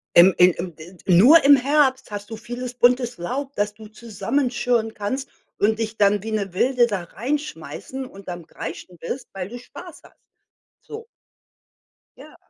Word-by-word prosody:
ähm, 180 +2 +8
äh, 180 - +8
ähm 175 -1 -5
de 175 +4 -13
nur 225 - +7
im 285 - +9
Herbst 265 -2 +1
hast 205 0 -6
du 225 - -6
vieles 245 +2 -6
buntes 245 0 +2
Laub, 265 +11 -4
dass 205 0 -1
du 215 0 -13
zusammenschirren 235 +1 -1
kannst 260 +7 -4 0.3
und 220 +2 +1
dich 220 -1 -3
dann 205 -1 +3
wie 220 - -6
'ne 200 -4 -2
Wilde 245 +5 +3
da 205 -5 -3
reinschmeissen 265 - -5
und 195 -6 -13
am 175 -2 -6
Kreischen 170 +2 -8
bist, 245 - -6
weil 190 -1 -5
du 245 +3 -8
Spaß 245 - -12
hast, - - -19 0.7
so. 450 +1 -10 1.1
Ja. - - -14
225 Hz, 165 wpm, -22 LUFS, 195-255 Hz, 1.1 s, im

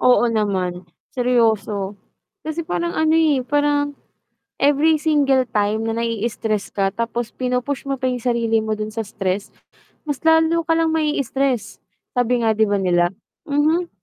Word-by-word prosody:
Oo 245 -1 +4
naman, 190 -5 -1 0.3
seryoso. 220 -5 +1 0.5
Kasi 315 +2 -3
parang 170 - -2
ano 315 - +2
eh, 310 -5 +3
parang 290 +1 0 0.6
every 290 +3 +3
single 290 -4 +2
time 210 +1 0
na 225 +1 -2
naii-stress 225 -2 -2
ka 195 -1 +1
tapos 235 +1 -3
pinu-push 250 +2 -2
mo 275 -2 -3
pa 260 - 0
yung 250 -2 -2
sarili 230 -2 +1
mo 220 - -3
dun 215 0 -2
sa 225 +1 -4
stress, 195 -1 -3 0.5
mas 290 -3 -3
lalo 320 +1 +4
ka 325 0 +1
lang 325 -1 +2
mai-stress, 275 -6 -1 0.3
sabi 245 -1 +1
nga 220 - +4
'di 220 -1 +2
ba 205 - +1
nila, 180 -3 +2 0.4
mhm. 310 +5 +2
245 Hz, 150 wpm, -21 LUFS, 215-290 Hz, 0.6 s, Oo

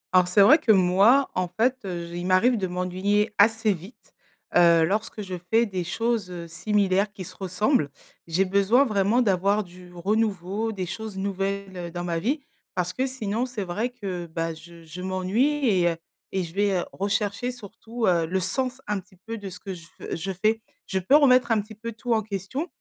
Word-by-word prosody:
Alors 180 -1 +6
c'est 185 +3 +4
vrai 285 +11 +8
que 235 - +3
moi, 200 +8 +5
en 185 -1 0
fait 225 +9 +1
j 175 -2 -5
il 180 - -4
m'arrive 190 +7 +4
de 190 - -1
m'ennuyer 185 +4 0
assez 220 0 +4
vite, 185 +6 -13 0.4
heu, 170 -2 +6
lorsque 210 +3 -2
je 190 -2 -7 0.2
fais 230 +1 +5
des 190 -4 -3
choses, 225 +2 -1
heu, 175 -2 -7
similaires 200 +2 +1
qui 200 -2 -8
se 185 +1 -11
ressemblent. 190 - +1 0.4
J'ai 180 +4 +2
besoin 200 +8 +4
vraiment 215 +2 +2
d'avoir 200 +1 +2
du 180 -1 -14
renouveau, 200 +2 -1
des 190 -4 -4
choses 210 +3 -6
nouvelles 195 -2 -3
dans 175 +1 -4
ma 170 -1 -1
vie, 275 - -1 0.3
parce 180 0 -1
que 260 +1 0
sinon 235 -2 -2
c'est 240 -5 -4
vrai 205 +7 -2
que, 185 -8 -5
bah, 165 0 -3
je 165 +1 -14
je 165 +3 -9
m'ennuie 210 +11 +1
et 185 -5 +3
heu, 165 - -2 0.4
et 190 -1 -1
je 165 -1 -8
vais 195 -2 +1
rechercher 200 +4 -1
surtout, 230 0 -6
heu, 170 -4 +2
le 190 +3 0
sens 255 +7 -2
un 205 -1 -1
petit 185 0 -18
peu 230 0 -5
de 200 -1 -6
ce 180 0 -10
que 195 0 -6
je 170 -2 -12
v - - -8
je 175 +4 -4
fais. 215 +4 +1 0.2
Je 190 - -1
peux 190 +10 +4
remettre 255 -5 +5
un 225 - +4
petit 215 +2 -7
peu 230 +2 -6
tout 235 +2 -2
en 220 - +2
question 210 - -4
195 Hz, 200 wpm, -25 LUFS, 180-225 Hz, 0.4 s, vrai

